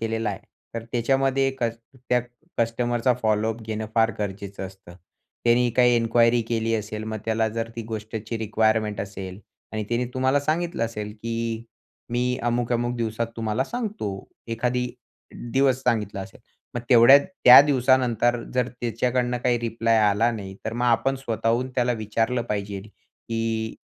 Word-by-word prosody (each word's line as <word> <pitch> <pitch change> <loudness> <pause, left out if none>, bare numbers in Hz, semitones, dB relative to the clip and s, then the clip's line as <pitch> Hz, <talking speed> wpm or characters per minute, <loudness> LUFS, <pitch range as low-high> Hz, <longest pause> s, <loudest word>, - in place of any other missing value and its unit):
केलेला 115 -1 -1
आहे 95 - -6 0.3
तर 115 0 -4
त्याच्यामध्ये 135 +2 +2
कस 115 -1 0 0.3
त्या 125 0 +3 0.4
कस्टमरचा 120 +1 +1
फॉलो 110 +1 +2
अप 115 - -13
घेणं 110 0 -4
फार 115 0 +4
गरजेचं 100 -1 -5
असतं. 95 -2 -14 0.5
त्याने 120 +1 +4
काही 125 -1 +5
इन्क्वायरी 115 +1 +3
केली 115 -1 0
असेल 110 0 -4
मग 110 0 -4
त्याला 110 0 +1
जर 115 +1 -3
ती 115 - -3
गोष्टची 110 +1 -5
रिक्वायरमेंट 110 -1 +1
असेल 95 -1 -6 0.3
आणि 110 -1 -2
तिने 120 +1 0
तुम्हाला 130 +2 +2
सांगितलं 155 -4 -1
असेल, 105 -2 -5
की 115 +1 -4 0.5
"मी 125 +1 0
अमुक-अमुक 120 0 0
दिवसात 115 0 -1
तुम्हाला 110 +3 -1
सांगतो," 220 - -4 0.4
एखादी 125 +2 -1 0.6
दिवस 130 -1 +3
सांगितला 105 -6 0
असेल, 95 0 -10 0.3
मग 120 - -2
तेवढ्या 125 +3 +9
त्या 160 -10 +8
दिवसानंतर 125 -4 +2
जर 125 -1 +1
त्याच्याकडनं 125 +1 -1
काही 120 -1 +3
रिप्लाय 115 -1 +1
आला 110 +4 +2
नाही, 100 -4 -7
तर 110 - -3
मग 120 +1 -1
आपण 120 +3 +2
स्वतःहून 115 0 -1
त्याला 125 0 +2
विचारलं 115 +2 -1
पाहिजेल, 100 0 -4
की 115 0 -4
115 Hz, 145 wpm, -24 LUFS, 110-125 Hz, 0.6 s, तेवढ्या